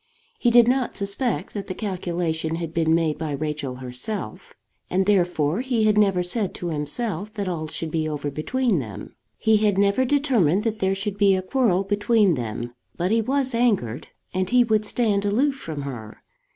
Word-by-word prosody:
He 240 - +3
did 235 -1 +6
not 255 0 0
suspect 200 +5 -2
that 200 -2 -5
the 185 - -4
calculation 175 -5 -2
had 165 -1 -5
been 160 -1 +2
made 160 -2 0
by 155 -2 -3
Rachel 150 -2 -3
herself; 125 - -5 0.3
and 190 +1 +1
therefore 180 -2 +2
he 250 -4 0
had 215 -1 +4
never 195 -4 +3
said 195 +2 -1
to 175 - -4
himself 175 +6 -2
that 200 -2 -3
all 165 -3 -3
should 160 +1 -4
be 155 -1 -1
over 145 -1 -3
between 220 - 0
them. 110 -7 -8 0.2
He 220 -1 +3
had 210 -2 +2
never 200 +5 +3
determined 245 - +2
that 220 -2 -2
there 190 0 +1
should 200 +1 -4
be 200 -2 +5
a 185 - -2
quarrel 195 -3 +1
between 205 0 +2
them. 120 -2 -4 0.2
But 180 +3 0
he 225 0 +3
was 265 +2 0
angered, 205 - 0 0.3
and 185 0 -1
he 250 0 +5
would 215 -2 +1
stand 205 -2 +1
aloof 245 +8 +2
from 160 - -6
her. 115 -6 -8
195 Hz, 185 wpm, -23 LUFS, 160-220 Hz, 0.3 s, did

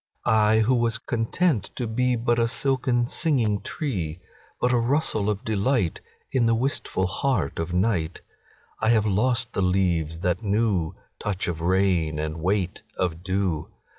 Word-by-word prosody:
I 110 0 +4
who 115 +4 +3
was 115 -2 +1
content 120 - 0
to 125 - -2
beBut 120 0 +1
a 115 - +3
silken 125 -1 +1
singing 120 -7 +1
tree, 90 - -3 0.4
But 125 0 +2
a 120 - +3
rustle 120 -4 +1
of 105 -1 -2
delightIn 110 - 0 0.5
the 115 - +3
wistful 120 -6 0
heart 95 - -1
of 80 +1 -2
night,I 90 +3 -3
have 110 -2 +4
lost 115 +4 +1
the - - -1
leaves 85 -4 +1
that 90 -2 +1
knewTouch 100 -3 -2
of 85 -2 -3
rain 90 -3 +2
and 75 +1 -3
weight 95 0 0 0.2
of 85 -2 -1
dew. 95 -4 -1
105 Hz, 135 wpm, -25 LUFS, 90-120 Hz, 0.5 s, I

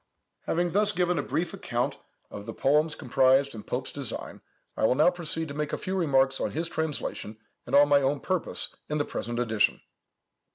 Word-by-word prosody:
Having 175 +1 +1
thus 210 +3 +4
given 180 -1 +1
a - - +2
brief 170 +1 -2
account - - -2 0.3
of 100 +1 -8
the 115 - -6
poems 150 +3 +2
comprised 135 +2 +3
in 110 - -7
Pope's 125 +4 -4
design, 140 -5 -5 0.3
I - - -3
will 125 - +3
now 155 +5 +5
proceed 160 -2 -3
to - - -5
make 150 +1 -3
a - - 0
few 190 - -3
remarks 135 -6 +2
on - - 0
his 165 +2 -2
translation, 160 -9 -3 0.3
and 130 - 0
on 145 +1 +7
my 145 -1 +5
own 140 +1 +1
purpose 185 -3 -2 0.2
in 150 - 0
the 145 - 0
present 120 +1 -4
edition. 110 -3 +1
145 Hz, 195 wpm, -27 LUFS, 130-165 Hz, 0.3 s, on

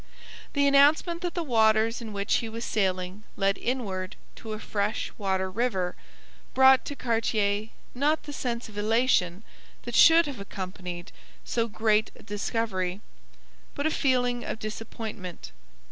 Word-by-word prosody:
The 285 -1 +3
announcement 295 +5 +4
that 355 -1 -3
the 345 - -1
waters 225 -3 +3
in 225 -2 -6
which 200 0 +1
he 230 - -3
was 230 +1 -5
sailing 185 -1 -1 0.2
led 195 0 +1
inward 200 -7 -3 0.2
to 220 -1 -6
a - - -4
fresh 210 0 -2
water 190 -2 0
river 190 -3 -1 0.6
brought 265 0 +6
to 285 - -5
Cartier 220 -4 0 0.3
not 295 +5 +1
the 290 - -7
sense 240 -4 -3
of 210 -1 -7
elation 215 -4 +2 0.4
that 240 - -6
should 330 +6 +7
have 280 -6 -6
accompanied 185 -2 -6 0.3
so 230 -1 0
great 215 0 +2
a - - -15
discovery, 205 -3 -2 0.8
but 285 - -2
a 315 - +2
feeling 245 -3 +1
of - - -4
disappointment. 215 - -7
220 Hz, 145 wpm, -27 LUFS, 200-250 Hz, 0.8 s, should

